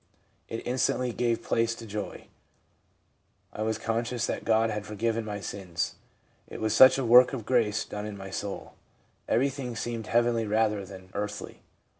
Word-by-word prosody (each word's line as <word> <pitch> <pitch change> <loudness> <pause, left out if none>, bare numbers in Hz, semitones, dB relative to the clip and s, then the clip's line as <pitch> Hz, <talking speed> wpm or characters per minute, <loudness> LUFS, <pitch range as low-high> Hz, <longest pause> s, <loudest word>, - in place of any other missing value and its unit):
It 115 - -5
instantly 125 0 0
gave 120 0 0
place 115 0 +1
to 115 - -10
joy. 105 -1 -6 1.3
I - - -6
was 110 0 0
conscious 115 +2 -1
that - - -3
God 110 0 +3
had 105 -1 -3
forgiven 110 +2 -1
my 105 -1 -4
sins. 95 -3 -3 0.5
It - - -8
was 110 -1 0
such 130 +4 +8
a 135 - -1
work 125 +3 +7
of 120 -5 -4
grace 115 -5 +2
done 105 0 -5
in 105 -1 -7
my 95 0 -8
soul. 100 0 -5 0.6
Every 135 +4 +3
thing 125 -3 -5
seemed 115 0 -4
heavenly 120 -1 +2
rather 105 -1 +1
than 95 -1 -12
earthly. 105 0 -5
110 Hz, 165 wpm, -28 LUFS, 105-120 Hz, 1.3 s, such